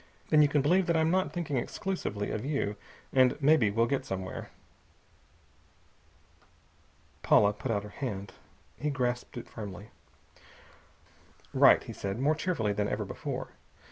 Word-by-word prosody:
"Then 155 -1 +6
you 150 - +6
can 145 -1 +1
believe 180 +5 +3
that 170 -1 +2
I'm 160 0 +2
not 185 +1 +1
thinking 165 -6 -2
exclusively 120 - -3
of 110 - -3
you, 135 -7 -1 0.4
and 130 0 +4
maybe 145 -6 +4
we'll 115 +3 +2
get 135 +2 -1
somewhere." 95 -6 -5 2.7
Paula 105 0 +5
put 110 +5 -6
out 105 -3 0
her 105 - -8
hand. 100 -4 -5 0.4
He 150 - -2
grasped 125 -3 -2
it 120 - -7
firmly. 105 -2 -8 1.6
"Right!" - - +6
he - - -8
said, 100 +1 -4
more 140 +5 +2
cheerfully 155 - -1
than 105 0 -1
ever - - -2
before. - - -5
125 Hz, 140 wpm, -30 LUFS, 105-150 Hz, 2.7 s, Then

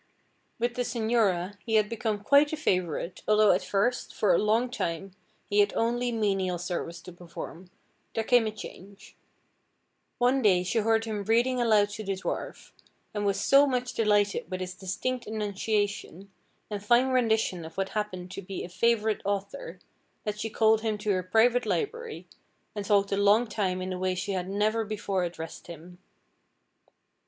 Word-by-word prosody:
With 240 +1 -1
the 250 - -2
señora 220 -6 0
he 225 -1 -1
had 215 -1 +4
become 215 -2 -3
quite 285 +5 +5
a 315 - -2
favorite, 180 - -1
although 215 -1 +5
at 180 - +2
first, 225 +5 -1
for 200 -4 +3
a - - +4
long 225 +4 +1
time, 185 -4 -3 0.3
he 205 - +1
had 205 0 +3
only 240 +1 0
menial 195 -5 0
service 175 -1 -4
to 180 - -10
perform, 175 +1 -9 0.5
there 225 - 0
came 240 -1 +4
a - - -2
change. 200 -2 -11 1.0
One 250 +2 +3
day 185 -5 +4
she 205 +5 0
heard 225 +1 +2
him 215 -2 -3
reading 240 +3 +2
aloud 215 -3 +4
to 215 +1 -6
the 195 -1 -1
dwarf, 185 - -5 0.4
and 205 -1 -1
was 200 - +1
so 280 +1 +5
much 250 -2 -1
delighted 205 -2 +1
with 185 -1 -4
his 185 0 -4
distinct 195 +7 -3
enunciation, 205 -2 -2 0.4
and 205 -1 -4
fine 240 +4 +4
rendition 225 -8 +1
of 160 +2 -10
what 195 0 -1
happened 185 -4 -4
to 195 - -6
be 195 0 -6
a - - -7
favorite 220 +3 +1
author, 200 -3 -4 0.5
that 210 0 -3
she 225 - -2
called 220 0 +3
him 220 -2 -1
to 210 0 -1
her 185 -1 +1
private 230 +7 +3
library, 470 +1 -3 0.5
and 205 -1 -4
talked 200 -1 +2
a 195 - +1
long 205 +4 +4
time 190 -4 -2
in 185 0 -3
a 180 - -5
way 185 0 0
she 180 +2 -3
had 185 -1 -2
never 215 +3 +1
before 200 -3 -2
addressed 165 -2 -6
him. 175 +1 -11
210 Hz, 175 wpm, -28 LUFS, 185-225 Hz, 1.0 s, quite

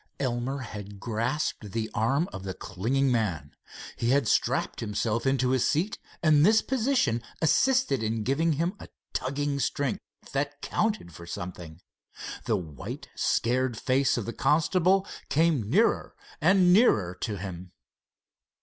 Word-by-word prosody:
Elmer 130 +1 -2
had 105 -4 -8
grasped 115 -1 -2
the 110 -1 -1
arm 135 +9 +1
of 95 - -6
the 95 -1 -5
clinging 125 +8 0
man. 90 -12 -1 0.4
He 115 - -1
had 135 -2 +3
strapped - - +1
himself 115 +2 -1
into 130 -1 +2
his 130 -2 +2
seat, 175 +8 0 0.2
and 150 -2 +5
this 215 +5 +5
position 250 - +1 0.2
assisted 245 - +3
in 110 0 -1
giving 155 +7 +1
him 170 +5 0
a - - -10 0.3
tugging 140 +2 -1
strength 140 0 -1 0.3
that 145 +1 -2
counted 215 - -1
for 85 +2 -11
something. 90 -2 -7 0.6
The - - +1
white, 80 -6 -7
scared 125 0 +1
face 130 +3 +2
of 115 - -2
the 115 - -4
constable 185 +5 +2 0.2
came 150 -9 +2
nearer 220 - +2 0.3
and 185 -2 +5
nearer 105 - +4
to 110 -4 -2
him. 90 -2 -7
130 Hz, 140 wpm, -27 LUFS, 105-155 Hz, 0.6 s, and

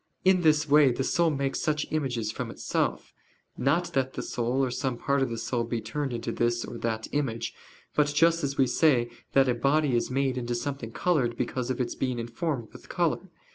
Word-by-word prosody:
In 185 -1 +5
this 155 -2 +3
way 145 -2 +6
the 130 +2 -1
soul 170 +4 +2
makes 140 -2 -1
such 155 -2 0
images 125 -8 -1
from - - -5
itself; - - -2 0.4
not 165 +7 +1
that 130 -1 0
the - - -4
soul 125 +3 0
or 125 - -3
some 125 -1 -2
part 140 +2 +1
of 135 - +1
the 115 - -4
soul 115 +1 -1
be 115 0 -2
turned 135 +6 -3
into 115 -1 -3
this 120 0 0
or 120 - -7
that 110 -1 -2
image; 135 -6 -2 0.4
but 150 -1 +3
just 165 +3 +3
as 140 0 -2
we 135 - +5
say 125 -2 +3 0.2
that 135 -1 +5
a 125 - +3
body 140 +2 +2
is 120 - 0
made 130 0 0
into 120 0 -2
something 125 -2 -4
colored 125 -7 +1
because 125 0 -2
of 130 - -2
its 125 - -1
being 130 -2 -2
informed 120 +2 -3
with - - -14
color. - - 0
130 Hz, 210 wpm, -27 LUFS, 120-145 Hz, 0.4 s, way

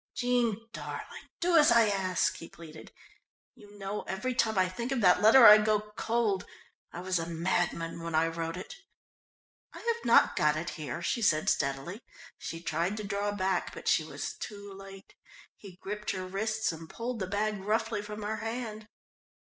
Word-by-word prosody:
"Jean 235 -3 0
darling, - - -8
do 350 0 +2
as 305 0 +6
I 230 -2 +6
ask," 190 -3 0
he 165 - -10
pleaded. 160 -2 -12 0.6
"You 205 0 -16
know, 200 +1 -4
every 230 +7 -2
time 220 -3 +1
I 185 -1 +4
think 235 +8 -5
of 265 - 0
that 180 -1 +5
letter 230 +4 +8
I 210 0 +11
go 210 0 0
cold. 225 -5 0 0.4
I 175 - -7
was 185 -1 0
a 165 - -4
madman 170 0 -1
when 165 -1 -4
I 160 +1 +4
wrote 165 +1 -3
it." 185 - -8 1.0
"I - - -10
have 470 0 -2
not - - +5
got 150 0 +3
it 165 +2 -4
here," 155 +1 -6
she 235 - -1
said 155 -8 +3
steadily. 140 - -2 0.4
She 165 - -6
tried 170 +6 -1
to 215 - -4
draw 200 0 -2
back, 190 -2 -1
but - - -9
she - - +3
was - - -5
too 205 -1 -8
late. 195 0 -12 0.4
He 195 -4 -13
gripped 210 +2 -5
her 185 -1 -4
wrists 215 +3 -1
and 160 0 -10
pulled 235 0 -5
the 190 - -2
bag 210 +2 -1
roughly 220 +1 0
from 210 0 -7
her 215 +1 -2
hand. 220 -1 -5
205 Hz, 180 wpm, -30 LUFS, 175-220 Hz, 1.0 s, I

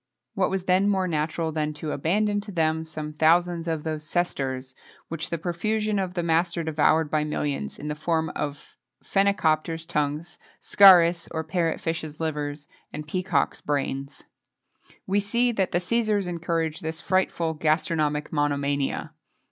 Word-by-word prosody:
What 195 -4 +1
was 190 -1 -2
then 185 +2 +3
more 190 -2 +1
natural 160 0 -1
than 155 -1 -2
to 150 0 -5
abandon 205 +7 +1
to 205 0 -9
them 160 -2 +1
some 155 -1 -6
thousands 170 +2 +2
of 160 -2 -2
those 155 -1 -3
sesterces, 135 -6 -2 0.4
which 165 -1 -3
the 170 - -2
profusion 210 +5 -1
of 185 -1 -3
the 175 - -1
master 170 +1 +1
devoured 155 0 +2
by 155 -1 +2
millions, 150 -2 -3
in 150 - -7
the 150 - -1
form 160 +1 -1
of 145 -1 -5 0.3
phenicopters' 165 -5 +1
tongues, 150 0 -2 0.2
scarus 175 -4 +6
or 160 -1 -3
parrot 165 0 -1
fishes' 160 -2 -4
livers, 150 -2 -3 0.2
and 150 0 -7
peacocks' 180 -3 0
brains? 140 -1 -3 0.8
We 195 +2 +1
see 235 +4 +1
that 195 -5 0
the - - +2
Cæsars 210 +2 +1
encouraged 165 -2 -2
this 160 0 -4
frightful 180 -3 0
gastronomic 155 -1 0
monomania. 145 -1 -1
160 Hz, 150 wpm, -25 LUFS, 150-180 Hz, 0.8 s, scarus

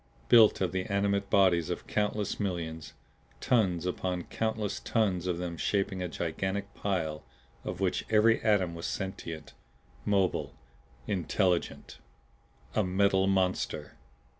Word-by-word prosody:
Built 110 -4 +7
of 90 -3 +1
the 95 0 -2
animate 100 0 0
bodies 90 -5 +4
of - - -4
countless 105 -1 -1
millions! 85 -5 -3 0.5
Tons 90 -8 +2
upon 90 -1 -2
countless 110 0 -2
tons 95 -6 0
of 90 -2 0
them 85 -1 -4
shaping 100 0 0
a 90 - -1
gigantic 95 +5 -3
pile 80 -6 -2 0.4
of 90 - -5
which 95 -2 0
every 110 +1 +4
atom 100 -6 +2
was 85 0 -5
sentient, 85 -4 -5 0.5
mobile 95 0 0 0.5
intelligent! 90 -1 -1 0.7
A 110 - +2
Metal 95 +1 +2
Monster! 95 -1 0
95 Hz, 120 wpm, -30 LUFS, 90-100 Hz, 0.7 s, Built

